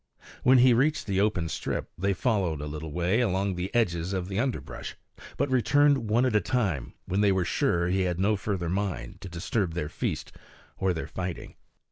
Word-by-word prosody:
When 130 +1 +6
he 125 0 +6
reached 145 +6 +2
the 100 -1 +1
open 100 -6 +1
strip - - -3
they 100 +2 0
followed 95 - 0
a 75 - -4
little 75 +1 -6
way 90 +7 +1
along 100 -3 +1
the 90 +1 -3
edges 90 -5 +1
of 95 -1 -2
the 100 +1 -2
underbrush, 130 0 -3 0.4
but 140 - 0
returned 135 -1 +3
one 120 +4 +3
at 125 -4 +1
a 105 - +4
time 95 - -1
when 95 +3 0
they 100 -1 +4
were 95 -2 +1
sure 85 0 +1
he 95 +2 +1
had 90 -1 -1
no 105 +3 +3
further 95 -3 -2
mind 95 -9 -3
to 95 - -7
disturb 90 0 -2
their 75 -4 -2
feast - - -3 0.5
or 95 -1 +1
their 80 -2 -3
fighting. 90 -1 -5
95 Hz, 195 wpm, -27 LUFS, 85-110 Hz, 0.5 s, When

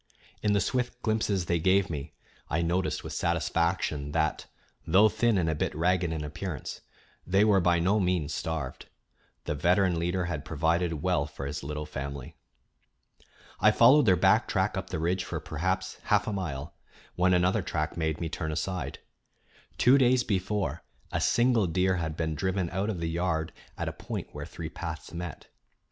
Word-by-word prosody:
In 105 -1 +2
the 100 - +3
swift 125 +2 -1
glimpses 110 -4 0
they 85 0 +1
gave 95 +3 +3
me 75 -2 -6 0.3
I 85 +2 +1
noticed 90 +3 0
with - - -6
satisfaction 85 -3 0
that, 80 -1 0 0.4
though 100 +6 +6
thin 115 -1 +2
and 85 -3 +1
a 80 - +1
bit 75 - -2
ragged 90 +1 +1
in 80 -2 -3
appearance, 75 0 -5 0.5
they 95 +4 +4
were 100 -3 +4
by 85 0 +3
no 95 +6 +2
means 90 -5 0
starved. 75 -3 -4 0.6
The - - -2
veteran 90 +3 +2
leader 90 +2 0
had 85 - -3
provided 80 -1 0
well 90 -6 +1
for 70 -2 -7
his 70 +2 -4
little 75 +2 -4
family. 70 0 -6 1.2
I - - +6
followed 145 -2 +6
their 95 - +6
back - - +4
track - - 0
up - - -4
the - - -3
ridge 85 +4 0
for - - -4
perhaps 95 +4 -2
half 105 -1 +3
a 110 - -2
mile, 80 -6 -4 0.4
when 90 +1 +3
another 90 +4 +2
track 75 -3 -2
made 80 -2 -1
me 85 - -2
turn 80 0 -3
aside. 85 +3 -3 0.8
Two 130 +3 +6
days 125 -1 +4
before, 95 - -1 0.3
a - - -1
single 120 -4 +3
deer 90 +2 +1
had 80 -2 -3
been 80 -2 -1
driven 95 +2 -1
out 95 +3 -1
of 90 -6 -3
the 85 - -1
yard 80 -1 -1 0.2
at - - -3
a - - -3
point - - -6
where - - -7
three - - -6
paths 80 -1 -7
met. 85 -2 -7
85 Hz, 175 wpm, -28 LUFS, 80-95 Hz, 1.2 s, though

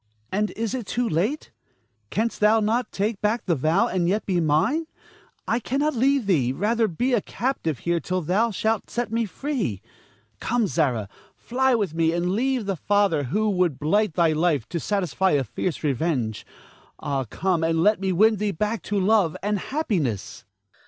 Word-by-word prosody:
Ernest. 110 0 -43
And 210 +2 0
is 230 - -2
it - - -1
yet 235 - -8
too 245 +1 -1
late? 205 - -1 0.6
Canst 225 +2 -1
thou 215 +1 +5
not 225 +3 0
take 205 +1 -2
back 215 +3 0
the 175 - +2
vow, 160 +6 +2
and 175 -2 0
yet 210 +3 0
be 185 -3 +1
mine? 165 - +1 0.6
I 230 +2 +1
cannot 280 +6 0
leave 265 0 +2
thee, 145 -11 +2
rather 220 - +1
be 245 +9 -1
a 235 - +3
captive 220 - -2
here 170 +4 0
till 185 +4 -2
thou 200 +9 +2
shalt 220 +1 -1
set 240 -2 -3
me 230 0 0
free. 215 - -3 0.6
Come, 240 -1 0
Zara, 135 - 0 0.3
fly 260 +1 +1
with 200 -8 -1
me, 165 0 +1
and 175 +1 0
leave 250 +2 0
the 195 -1 -1
father 195 -5 +1
who 210 - 0
would 180 -7 +1
blight 195 +6 +1
thy 170 -3 +3
life 155 -6 +1
to 170 - -2
satisfy 190 -1 0
a 140 -2 +2
fierce 160 - -4
revenge. 135 -6 -1 0.5
Ah, 140 -3 -2
come 175 - -1
and 165 0 +1
let 210 +1 +4
me 190 -1 0
win 215 +4 +4
thee 210 +1 -1
back 210 +4 -2
to 205 -1 -1
love 195 -4 +2
and 205 0 0
happiness. 175 - -2
195 Hz, 185 wpm, -24 LUFS, 160-225 Hz, 0.6 s, thou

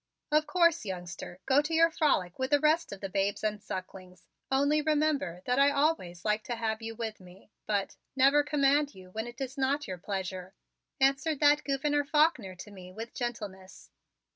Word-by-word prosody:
"Of 305 0 +3
course, 335 -2 +3
youngster, 175 -1 -7
go 270 +2 +4
to 310 +2 -2
your 330 +1 +5
frolic 195 - +1
with 260 0 -1
the 290 - +4
rest 310 +3 +2
of 200 - -8
the 195 - -3
babes 195 +2 -1
and 210 -1 -1
sucklings, 185 0 -8 0.3
only 285 +3 +3
remember 295 - 0
that 250 +2 +1
I 280 +1 +6
always 280 - 0
like 215 0 +1
to 240 - -3
have 220 -1 -2
you 225 0 -6
with 220 -1 -5
me, 185 +2 -17 0.2
but 200 -2 -1 0.2
never 275 +2 +5
command 290 0 +2
you 185 -1 -13
when 220 +4 -4
it 240 +2 -10
is 270 +1 -5
not 275 +1 0
your 185 -2 -5
pleasure," 190 -1 -5 0.4
answered 275 +2 +2
that 295 0 +5
Gouverneur 290 +1 0
Faulkner 285 - +2
to 205 +3 -10
me 185 -2 -11
with 225 +4 -8
gentleness. 210 -6 -6
240 Hz, 185 wpm, -30 LUFS, 190-290 Hz, 0.4 s, I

